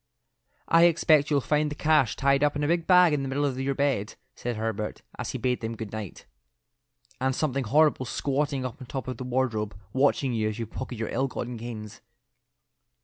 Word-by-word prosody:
"I 165 +1 +6
expect 155 -3 +4
you'll 145 -2 +2
find 150 +2 +1
the 150 - -5
cash 150 -5 +2
tied 140 0 +2
up 145 0 +2
in 145 - -1
a - - +1
big 170 +1 0
bag 180 -3 +6
in 145 - +1
the 135 - -3
middle 140 +2 0
of 130 -2 -2
your 135 +1 -1
bed," 130 -7 0 0.2
said 120 -1 -4
Herbert, 110 -1 -3 0.2
as - - -3
he - - -3
bade 125 -1 -1
them 115 0 -4
good 110 -2 -6
night, 110 -4 -7 0.9
"and 130 0 0
something 140 -3 -1
horrible 145 +1 +3
squatting 140 +1 -1
up 130 +1 -6
on 130 - -9
top 135 0 -5
of 130 -2 -4
the - - -5
wardrobe 120 -5 -1 0.2
watching 135 -1 +2
you 110 -2 0
as 105 - -5
you 115 - -3
pocket 125 +3 -7
your 110 0 -3
ill 135 +3 0
gotten 125 -1 -5
gains." 110 -2 -8
130 Hz, 205 wpm, -27 LUFS, 115-145 Hz, 0.9 s, I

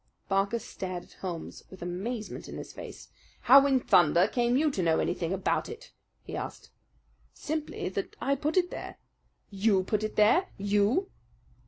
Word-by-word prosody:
Barker 195 +3 +1
stared 185 -5 -6
at - - -19
Holmes 175 -4 -6
with 190 -2 -10
amazement 205 +6 -5
in - - -7
his - - -8
face. - - -10 0.3
"How 275 +3 +7
in 265 -2 +3
thunder 175 -4 +4
came 240 +2 +1
you 305 +1 +2
to 200 - -2
know 165 -2 +3
anything 170 -1 -1
about 190 0 0
it?" 460 +2 -10 0.3
he - - -7
asked. - - -6 0.6
"Simply 305 0 -4
that 195 +1 -4
I 275 - +1
put 300 +5 -1
it 355 -1 +2
there." - - -7 0.5
"You 195 -1 +2
put 210 +2 -1
it 215 - -3
there! 225 - +4
You!" 205 - +1
210 Hz, 165 wpm, -29 LUFS, 190-275 Hz, 0.6 s, How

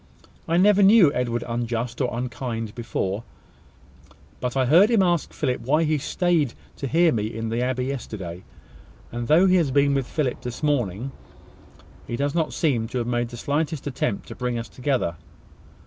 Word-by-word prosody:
"I 165 - +2
never 205 +2 +5
knew 195 -6 +7
Edward 120 -1 -1
unjust 120 +1 -2
or 125 - +1
unkind 120 -2 -4
before; 115 -3 -3 1.2
but 125 +1 -2
I 130 - +3
heard 170 - +6
him 225 -5 +4
ask 175 -3 +1
Philip 130 -4 -2
why 150 +7 +2
he 155 -1 +1
staid 165 -3 0 0.2
to 140 - -3
hear 165 +4 +4
me 105 -2 -1
in 115 0 -4
the 115 +2 -1
abbey 125 0 -1
yesterday; 100 -10 -5 0.7
and 120 0 -4
though 165 +5 +5
he 185 -1 +5
has 165 -5 +2
been 140 +1 +3
with 135 -3 0
Philip 140 -7 -2
this 125 -1 -6
morning, 125 -4 0 1.0
he 120 - -3
does 140 +3 -1
not 165 -2 0
seem 125 -8 0
to 125 - -4
have 120 - -1
made 120 0 -1
the 120 - -9
slightest 145 +3 -2
attempt 125 -7 -2
to - - -7
bring 125 -1 -2
us 115 0 -5
together. 125 - -1
130 Hz, 180 wpm, -24 LUFS, 120-150 Hz, 1.2 s, knew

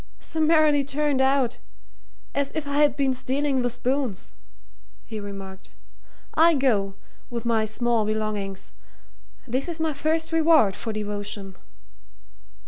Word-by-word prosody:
"Summarily 310 -2 +3
turned 285 0 0
out 265 -2 +2 0.7
as 280 0 0
if 315 -2 -2
I 285 0 -1
had 295 -1 +4
been 270 -2 +1
stealing 265 +2 0
the 245 -1 +1
spoons," 245 -3 -2 0.7
he 220 -2 -6
remarked. 195 -2 -8 0.6
"I 330 +1 +5
go 210 -8 +1 0.3
with 235 -1 -5
my 225 -2 +2
small 230 +1 +1
belongings. 210 -2 -3 0.7
This 260 +7 -1
is 335 -1 -4
my 320 -1 0
first 320 +3 -1
reward 320 - +4
for 225 - -4
devotion." 205 -2 -4
255 Hz, 125 wpm, -25 LUFS, 215-290 Hz, 0.7 s, I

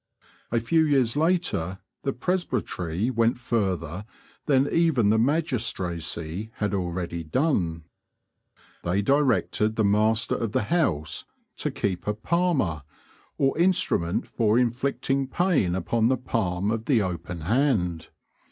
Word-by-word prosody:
A 115 - +2
few 160 +8 +2
years 135 -6 +2
later 155 - 0 0.2
the 135 - -1
presbytery 125 - -2
went 115 -1 +2
further 95 -6 -2 0.4
than 140 -1 +4
even 145 -12 +3
the 110 - +3
magistracy 105 - -1
had 105 -1 -2
already 85 -2 -3
done. 85 - 0 1.0
They 95 +4 0
directed 125 -4 +2
the 110 - +1
master 110 +2 +2
of 115 -2 -2
the 130 - +1
house 100 - 0 0.3
to - - -1
keep 95 -2 -3
a 105 - 0
"palmer," 135 - 0 0.6
or 135 -1 +2
instrument 170 - +1
for 110 -1 +1
inflicting 135 +2 0
pain 150 - +1
upon 110 +5 +1
the 130 +1 +2
palm 100 -5 -1
of 115 0 -2
the 125 -7 +3
open 85 -2 -5
hand. 90 - 0
110 Hz, 125 wpm, -25 LUFS, 90-135 Hz, 1.0 s, than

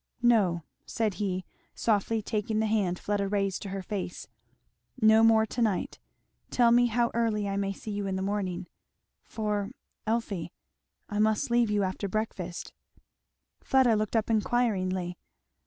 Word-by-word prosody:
No 200 -8 +3
" - - -52
said 220 -3 0
he 185 -2 -1 0.3
softly 220 0 +1
taking 215 0 -1
the 220 - +2
hand 205 -5 +1
Fleda 200 0 -1
raised 195 -1 -1
to 200 - -6
her 195 0 -4
face, 185 -2 -5 0.7
"no 220 -1 +6
more 220 -1 +5
tonight 220 -4 -1 0.5
tell 240 -2 +4
me 245 +1 +5
how 235 +1 +1
early 220 -3 0
I 195 - -2
may 195 0 0
see 210 +2 -7
you 205 -1 -2
in 190 - -1
the 190 - -2
morning 190 -3 -2 0.6
for, 210 -2 -2 0.4
Elfie, 205 -7 -1 0.6
I 210 - -3
must 215 +2 +2
leave 240 -2 +3
you 205 -1 +2
after 190 +2 -2
breakfast." 185 -4 -4 0.9
Fleda 260 -4 +4
looked 215 +2 -1
up 225 0 +1
inquiringly. 190 -6 0
210 Hz, 150 wpm, -28 LUFS, 195-225 Hz, 0.9 s, no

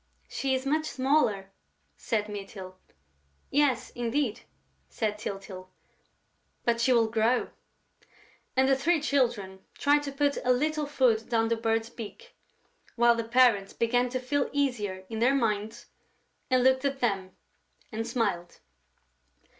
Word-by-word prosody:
"She 270 -1 -1
is 260 +1 -3
much 310 +3 0
smaller," 245 -8 +1 0.4
said 210 - -2
Mytyl. 195 -2 -8 0.8
"Yes, 285 -2 +1
indeed!" 240 -1 -1 0.5
said 210 -3 -2
Tyltyl. 195 -2 -7 1.0
"But 235 -1 +1
she 255 - +3
will 230 -2 +4
grow!..." 230 +2 +1 1.0
And 260 0 +4
the 270 - +4
three 320 +5 +2
Children 240 -10 0 0.2
tried 290 +1 +3
to 285 -1 -5
put 285 +1 0
a 250 - +3
little 300 +3 0
food 245 -6 +1
down 225 -1 +1
the 230 - +2
Bird's 225 0 -1
beak, 345 - -10 0.6
while 235 0 +5
the 230 0 -2
parents 230 -4 +3
began 245 +2 +1
to 255 +1 -2
feel 275 +2 -1
easier 215 -10 -1
in 225 +1 -5
their 255 +4 +3
minds 220 -1 -1 0.6
and 255 -2 +3
looked 260 +1 +3
at 275 -1 -1
them 195 -6 -1 0.6
and 225 0 -3
smiled. 175 -8 -2
240 Hz, 135 wpm, -28 LUFS, 215-270 Hz, 1.0 s, while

